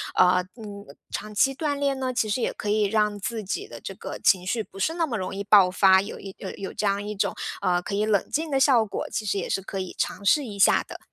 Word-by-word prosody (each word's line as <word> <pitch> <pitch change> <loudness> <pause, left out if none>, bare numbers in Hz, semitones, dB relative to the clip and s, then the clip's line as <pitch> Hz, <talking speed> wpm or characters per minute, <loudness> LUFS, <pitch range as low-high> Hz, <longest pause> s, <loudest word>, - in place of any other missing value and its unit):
呃， 180 0 +4
嗯， 205 -3 -9 0.3
长 215 - -5
期 270 +6 +3
锻 290 +1 -2
炼 280 -1 0
呢， 260 -1 -1
其 225 - 0
实 225 +4 0
也 - - 0
可 210 - -5
以 210 +1 +2
让 210 0 +1
自 220 +2 -4
己 390 - -4
的 - - -10
这 - - -7
个 - - -7
情 180 -2 +3
绪 220 +4 -1
不 195 - -14
是 320 +11 0
那 340 -1 +1
么 260 -7 -4
容 185 - -4
易 200 - -3
爆 200 -2 +6
发， 190 0 +5
有 200 - -7
一 195 -1 -9
呃， 190 - -5
有 195 - -6
这 210 - -2
样 200 +1 0
一 210 0 -5
种 200 - 0 0.5
可 200 - -3
以 210 +1 +1
冷 210 -3 +1
静 315 +1 -1
的 270 - +2
效 260 -5 +4
果， 200 - -4
其 215 - -3
实 200 -1 0
也 - - -3
是 195 - 0
可 195 0 -5
以 185 -1 -5
尝 - - -2
试 290 +7 +4
一 205 -4 -7
下 - - +5
的。 - - -9
210 Hz, 290 characters per minute, -25 LUFS, 195-250 Hz, 0.5 s, 爆